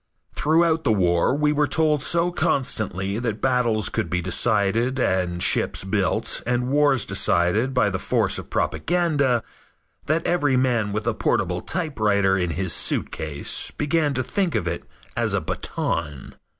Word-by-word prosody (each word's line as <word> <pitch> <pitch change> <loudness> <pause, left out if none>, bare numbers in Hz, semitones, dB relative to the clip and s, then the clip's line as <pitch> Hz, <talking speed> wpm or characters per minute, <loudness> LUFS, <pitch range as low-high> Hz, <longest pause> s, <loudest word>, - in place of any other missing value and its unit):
Throughout 160 +1 +2
the - - +2
war 90 +2 +2
we 150 0 +1
were 150 0 +1
told 155 -2 +1
so 170 +4 +2
constantly 105 - -1
that 115 -3 -3
battles 120 -5 +1
could 110 - -2
be 90 - -1
decided 110 +6 +1
and 90 -7 0
ships - - +2
built - - 0
and 125 0 -1
wars 145 -3 +3
decided 105 +9 +1
by 105 -5 +2
the 95 - -3
force - - +1
of - - -10
propaganda, 145 -9 0 0.6
that 160 +2 0
every 145 -7 +1
man 120 -5 +1
with 105 +1 -3
a 120 - 0
portable 90 -4 -1
typewriter 105 - 0
in 90 -2 -1
his 95 -3 0
suitcase 75 -2 -1
began 150 -1 0
to 130 - -1
think 185 +4 -1
of 85 - -1
it 85 0 -4 0.3
as - - 0
a - - +1
baton. 75 -5 -4
120 Hz, 150 wpm, -23 LUFS, 95-145 Hz, 0.6 s, wars